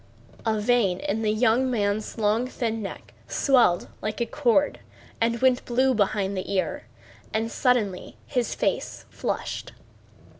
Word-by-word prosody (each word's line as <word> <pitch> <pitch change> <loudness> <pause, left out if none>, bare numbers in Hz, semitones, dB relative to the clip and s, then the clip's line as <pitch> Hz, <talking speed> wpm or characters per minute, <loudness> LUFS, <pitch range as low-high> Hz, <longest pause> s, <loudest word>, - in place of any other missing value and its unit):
A 220 -1 +2
vein 210 -5 +2
in 215 +3 -2
the 215 - +1
young 240 +3 +3
man's 210 -2 -1
long 220 +3 +1
thin 225 -3 -2
neck 195 - -8
swelled 245 -11 +3
like 215 +2 -3
a 235 - +1
cord 285 +2 +2 0.4
and 230 +1 +1
went 260 -1 +4
blue 260 +2 +2
behind 200 -2 0
the 185 +1 -4
ear, 190 -2 -1 0.5
and 225 +1 0
suddenly 220 -8 0
his 250 -4 -1
face - - -2
flushed. - - -4
225 Hz, 140 wpm, -25 LUFS, 205-250 Hz, 0.5 s, went